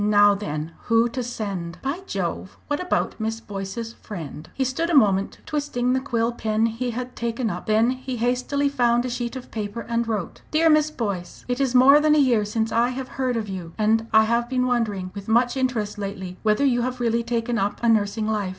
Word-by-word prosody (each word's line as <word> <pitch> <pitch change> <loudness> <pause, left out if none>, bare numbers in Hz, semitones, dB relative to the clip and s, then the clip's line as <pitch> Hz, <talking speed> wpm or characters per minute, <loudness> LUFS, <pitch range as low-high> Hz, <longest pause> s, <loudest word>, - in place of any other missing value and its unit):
Now 205 0 +5
then 160 -6 -4
who 230 0 +4
to 250 +2 -3
send? 200 -8 -4
By 275 +6 -2
Jove! - - -3
what 290 0 -1
about 360 -8 -1
Miss 220 +1 -2
Boyce's 205 +2 -6
friend?" 160 -9 -8
He 270 - +1
stood 265 +7 -1
a 340 - +2
moment 200 -5 +3
twisting 270 -4 -1
the 260 - +2
quill 235 -3 0
pen 220 -1 0
he 230 +2 -2
had 250 +1 -5
taken 235 -1 -2
up, 175 - -6
then 220 +3 +3
he 260 -1 -5
hastily 250 +4 0
found 240 -3 +2
a - - -2
sheet 240 0 -3
of 260 - -8
paper 215 +1 -4
and 235 0 -1
wrote: 210 -6 -3
"Dear 320 +1 +4
Miss 305 0 +4
Boyce, 200 -11 -4
It 250 +2 -1
is 260 -2 +1
more 275 +4 +8
than 305 0 +4
a - - +3
year 245 -7 +3
since 220 +2 -1
I 235 +2 +3
have 255 0 -5
heard 255 -2 -1
of 220 -2 -3
you, 180 -4 -6
and 225 +1 +2
I 220 0 +6
have 235 +2 0
been 255 -1 +1
wondering 215 -7 -1
with 200 -1 -8
much 240 +3 +3
interest 240 -6 -1
lately 190 -2 -5
whether 215 +5 +2
you 245 -3 +3
have 255 +1 -2
really 235 -1 +1
taken 235 0 -1
up 200 0 -1
a - - +3
nursing 215 -1 +2
life. 210 -3 -1
235 Hz, 215 wpm, -24 LUFS, 210-255 Hz, -, more